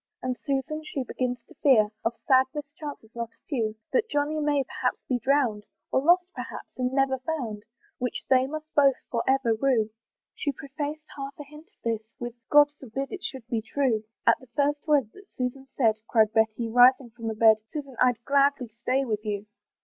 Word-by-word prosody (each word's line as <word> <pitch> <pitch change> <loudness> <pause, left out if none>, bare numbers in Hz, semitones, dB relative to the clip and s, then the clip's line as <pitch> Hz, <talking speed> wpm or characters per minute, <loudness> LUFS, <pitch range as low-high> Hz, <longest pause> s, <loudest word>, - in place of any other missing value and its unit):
And 255 0 -1
Susan 285 +2 -2
she 285 -3 -3
begins 245 -1 -3
to - - -16
fear 225 -7 +5
Of 230 +1 -1
sad 260 -1 +6
mischances 290 -5 -7
not 235 -1 -5
a - - -45
few, 225 -7 -1 0.2
That 455 -2 +2
Johnny 295 +2 0
may 290 -2 +2
perhaps - - -2
be 250 -2 0
drown'd, 245 -5 +2 0.3
Or 260 - +3
lost 350 +5 +5
perhaps, - - -8
and 250 -1 -1
never 265 -1 +2
found; 250 -7 -3 0.4
Which 250 -1 -3
they 260 0 +4
must 310 +2 -7
both 275 -2 +5 0.2
for 235 - +1
ever 265 -3 +3
rue. 225 -2 +1 0.4
She 285 - -2
prefaced 290 +3 -5
half 275 0 -6
a 295 - -7
hint 300 +3 -14
of 415 - -39
this 230 -2 0 0.2
With, 240 -1 -5 0.2
"God 290 0 +7
forbid 270 +2 -5
it 390 -2 -6
should 260 -4 -5
be 230 -2 -1
true!" 225 -1 0 0.2
At - - +5
the 260 - -16
first 290 +2 +1
word 280 -8 +3
that 395 0 -16
Susan 260 +1 -4
said 225 -5 +3
Cried 220 -2 +3
Betty, 220 +1 +2
rising 245 +1 +5
from 230 0 -7
the 220 - -2
bed, 220 0 +6
"Susan, 275 0 -7
I'd 245 -2 +2
gladly 280 -3 +3
stay 265 +3 +1
with 215 -3 -2
you. 205 -1 -3
265 Hz, 195 wpm, -27 LUFS, 230-285 Hz, 0.4 s, God